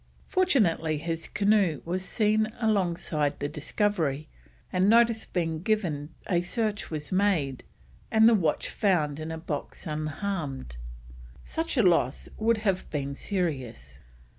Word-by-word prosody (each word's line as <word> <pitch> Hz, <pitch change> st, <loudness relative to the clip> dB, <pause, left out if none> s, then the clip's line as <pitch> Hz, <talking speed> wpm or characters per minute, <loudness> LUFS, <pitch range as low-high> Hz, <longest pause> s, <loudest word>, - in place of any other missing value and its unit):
Fortunately 205 Hz, -, +2 dB
his 165 Hz, +1 st, -3 dB
canoe 200 Hz, -7 st, +2 dB
was 180 Hz, +2 st, -1 dB
seen 215 Hz, +2 st, +2 dB
alongside 175 Hz, -9 st, 0 dB
the 145 Hz, -, -1 dB
Discovery, 155 Hz, -1 st, -1 dB, 0.5 s
and 185 Hz, +2 st, +3 dB
notice 230 Hz, 0 st, +4 dB
being 165 Hz, -3 st, -2 dB
given 175 Hz, -9 st, -1 dB, 0.2 s
a 175 Hz, -3 st, +1 dB
search 210 Hz, +3 st, -2 dB
was 150 Hz, -2 st, -5 dB
made, 185 Hz, -9 st, +1 dB, 0.5 s
and 220 Hz, 0 st, +6 dB
the 235 Hz, -, +6 dB
watch 170 Hz, -8 st, +1 dB
found 160 Hz, -9 st, +1 dB
in 155 Hz, +1 st, -5 dB
a 160 Hz, -, -4 dB
box 160 Hz, +2 st, -5 dB
unharmed. 155 Hz, -, -3 dB, 0.7 s
Such 325 Hz, -2 st, -3 dB
a 240 Hz, -, +5 dB
loss 165 Hz, -8 st, +2 dB
would 225 Hz, +1 st, +3 dB
have 190 Hz, -2 st, 0 dB
been 140 Hz, -2 st, -3 dB
serious. 130 Hz, -, -3 dB
175 Hz, 130 wpm, -27 LUFS, 150-210 Hz, 0.7 s, and